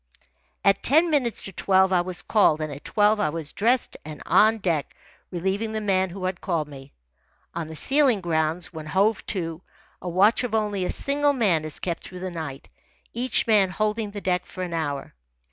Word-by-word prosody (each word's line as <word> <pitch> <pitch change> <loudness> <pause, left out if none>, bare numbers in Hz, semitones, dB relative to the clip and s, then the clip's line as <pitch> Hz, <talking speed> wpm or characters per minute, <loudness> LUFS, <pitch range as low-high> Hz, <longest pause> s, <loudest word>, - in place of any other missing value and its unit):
At 195 0 +4
ten 320 +5 +4
minutes 255 -6 0
to 195 - -4
twelve 190 0 +2
I 180 - +4
was 180 +1 -3
called, 195 -8 +3
and 155 -2 -4
at 140 - -10
twelve 210 0 +2
I 155 - +1
was 155 -1 -5
dressed 240 +4 +1
and 150 -1 -9
on 220 +1 +4
deck, 170 -8 -2 0.3
relieving 195 +5 -2
the 220 - -1
man 190 -3 +1
who 185 +1 -6
had 185 -1 -3
called 165 -5 -1
me. 140 -1 -12 0.6
On 170 -2 -4
the 160 - -8
sealing 270 - +3
grounds, 165 0 -1
when 155 -2 -7
hove 195 +7 +1
to, 165 -3 -3 0.4
a 180 - -4
watch 200 +8 +3
of 230 -3 -2
only 205 -3 0
a - - -2
single 285 +1 +1
man 195 - +2
is 155 - 0
kept 170 -2 -3
through 180 0 -10
the 185 -1 -4
night, 155 -5 -7 0.5
each 250 +2 0
man 210 -4 +4
holding 215 +3 -1
the 205 0 -7
deck 180 -1 -1
for 185 - -6
an 175 -2 -5
hour. 145 -4 -3
185 Hz, 195 wpm, -24 LUFS, 165-215 Hz, 0.6 s, At